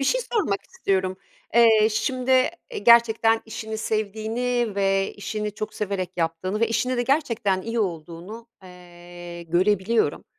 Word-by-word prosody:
Bir - - 0
şey - - +2
sormak 390 - 0
istiyorum. 190 -1 -1 0.4
Eee, 225 -2 +6
şimdi, 255 +4 -1
eee, 340 - +1
gerçekten 225 - +5
işini 220 0 -6
sevdiğini 220 +2 -1
ve 195 -1 +1
işini 210 +1 -4
çok 215 - -5
severek 195 -3 -3
yaptığını 175 +5 -2
ve 230 - +2
işinde 250 +3 0
de 245 - +1
gerçekten 235 -8 0
iyi 230 0 -2
olduğunu, 175 +4 -5 0.2
eee, 175 -1 -11
görebiliyorum. 190 +6 +1
215 Hz, 135 wpm, -24 LUFS, 185-235 Hz, 0.4 s, Eee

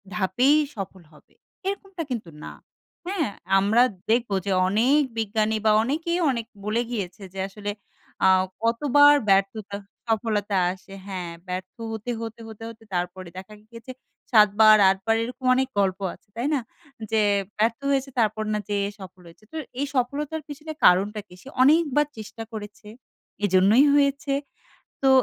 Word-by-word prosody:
ধাপেই 240 +9 +3 0.2
সফল 195 -2 -7
হবে। 150 - -22 0.3
এরকমটা 390 -3 -4
কিন্তু 230 -8 -4
না। - - -7 0.6
হ্যাঁ? 360 - -1 0.3
আমরা 220 +5 +4 0.3
দেখবো 230 -4 +1
যে 200 - -1 0.2
অনেক 240 +9 +3 0.2
বিজ্ঞানী 220 0 0
বা 215 - +6
অনেকেই 330 +7 -1
অনেক 230 -2 -3 0.2
বলে 220 +3 +1
গিয়েছে 195 -3 -4
যে 195 - -7
আসলে 205 +1 -5 0.5
আ - - +7 0.4
কতবার 290 +5 +5 0.2
ব্যর্থতা 195 +1 +1 0.3
সফলতা 215 -2 0 0.2
আসে। 190 +1 -15
হ্যাঁ, 180 -3 -5 0.2
ব্যর্থ 185 0 -5 0.2
হতে, 220 +2 -4
হতে, 225 0 -7
হতে, 220 0 -10
হতে 225 0 -13
তারপরে 180 +1 -3
দেখা 190 +3 -9 0.2
গিয়েছে 230 +2 -10 0.4
৭ 210 -3 +7
বার, 215 -1 +8
৮ 195 - +2
বার 225 - +3
এরকম 250 +2 -7
অনেক 265 0 +1
গল্প 195 -1 +1
আছে। - - -20
তাই 240 +4 -1
না? 285 - +2 0.5
যে 220 -1 +3 0.4
ব্যর্থ 225 +2 +1
হয়েছে, 270 0 0
তারপর 215 -1 +1
না 210 - 0
যেয়ে 200 -1 0
সফল 185 -1 -12
হয়েছে। 170 +6 -17
তো 320 - -6 0.2
এই 285 - +1
সফলতার 290 +5 -1
পেছনে 300 +2 -8
কারণটা 200 +4 +4
কি? - - -16
সে 265 - -12
অনেকবার 295 +1 +4
চেষ্টা 220 +1 -8
করেছে। 210 -1 -9 0.6
এজন্যই 200 +8 +5
হয়েছে। 280 0 +2 0.7
তো 270 - +4
220 Hz, 150 wpm, -24 LUFS, 200-265 Hz, 0.7 s, বার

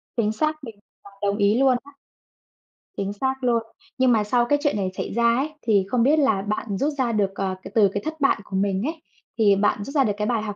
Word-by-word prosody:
Chính 215 -3 +1
xác, 305 +6 -2
mình 225 -4 -9 0.3
đồng 200 0 -17
đồng 200 - -4
ý 205 +3 +3
luôn 270 0 +4
á. 285 - -15 1.1
Chính 200 +1 -2
xác 265 +6 -1
luôn. 235 -2 +2 0.3
Nhưng 260 -1 +3
mà 220 -3 +3
sau 240 +3 +1
cái 290 +4 +1
chuyện 290 - +1
này 190 -2 -1
xảy - - -4
ra 235 +1 +3
ấy, 280 +4 -1
thì 205 -4 +2
không 245 -2 +2
biết 295 +5 +4
là 245 -9 +2
bạn 210 0 -3
rút 295 +8 0
ra 255 -3 +1
được, 205 -3 0
ờ, 190 -1 -2
cái - - -9
từ 210 -3 +5
cái 205 - -3
thất 315 0 -5
bại 275 - +3
của 195 - -8
mình 195 0 0
ấy, 315 +4 -4 0.4
thì 205 -3 +4
bạn 205 +1 +1
rút 275 - -8
ra 280 - +5
được 210 -5 0
cái 210 0 -1
bài 235 -3 0
học 210 -2 -5
225 Hz, 255 wpm, -23 LUFS, 205-265 Hz, 1.1 s, từ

